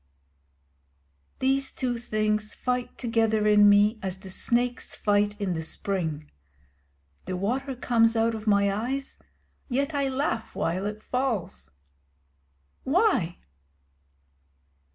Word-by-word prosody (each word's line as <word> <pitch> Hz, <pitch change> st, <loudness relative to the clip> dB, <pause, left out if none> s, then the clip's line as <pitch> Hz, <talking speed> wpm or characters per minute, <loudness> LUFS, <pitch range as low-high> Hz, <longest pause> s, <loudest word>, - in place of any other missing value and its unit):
These 270 Hz, +1 st, +1 dB
two 245 Hz, -2 st, -2 dB
things 215 Hz, -2 st, -1 dB
fight 250 Hz, -1 st, -2 dB
together 225 Hz, -3 st, +1 dB
in 210 Hz, -1 st, +6 dB
me 205 Hz, +2 st, +4 dB
as 190 Hz, -1 st, -3 dB
the 190 Hz, -1 st, -10 dB
snakes 245 Hz, +5 st, -1 dB
fight 205 Hz, 0 st, +1 dB
in 195 Hz, -3 st, -1 dB
the 160 Hz, -, -3 dB
spring. 160 Hz, -3 st, -3 dB, 0.9 s
The 185 Hz, -, -3 dB
water 260 Hz, +8 st, -2 dB
comes 230 Hz, -2 st, +3 dB
out 225 Hz, 0 st, +2 dB
of 220 Hz, 0 st, -7 dB
my 200 Hz, -1 st, +3 dB
eyes; 260 Hz, +6 st, -3 dB, 0.5 s
yet 275 Hz, +4 st, 0 dB
I 280 Hz, -1 st, 0 dB
laugh 260 Hz, -4 st, -2 dB
while 185 Hz, +4 st, -1 dB
it 210 Hz, +1 st, -6 dB
falls. 210 Hz, -, -2 dB, 1.1 s
Why? 270 Hz, -, +2 dB
220 Hz, 110 wpm, -26 LUFS, 200-250 Hz, 1.1 s, in